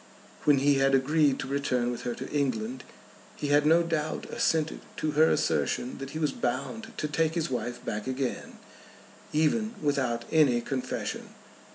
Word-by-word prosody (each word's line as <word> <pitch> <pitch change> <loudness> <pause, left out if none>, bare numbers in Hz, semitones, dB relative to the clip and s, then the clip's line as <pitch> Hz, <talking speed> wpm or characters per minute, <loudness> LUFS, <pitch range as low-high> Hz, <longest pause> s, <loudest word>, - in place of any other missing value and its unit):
When 145 -2 +6
he 140 0 +3
had 135 0 +4
agreed 140 +1 +3
to - - -5
return 130 -3 0
with 120 - -5
her 120 -1 -2
to - - -7
England 130 -3 -1 0.5
he 145 - -3
had 145 +1 +4
no 165 +2 +5
doubt 155 -2 -2
assented 160 -1 +1 0.2
to 155 - -1
her 155 +2 +5
assertion 125 - 0
that 135 0 -6
he 155 - -6
was 150 -3 +1
bound 140 - -3
to 150 - -1
take 160 +2 0
his 160 -5 -1
wife 120 0 -4
back 105 +2 -3
again, 130 0 -3 0.7
even 215 +10 +1
without 130 -5 0
any 145 -7 +4
confession. 130 +1 -4
140 Hz, 165 wpm, -28 LUFS, 130-155 Hz, 0.7 s, When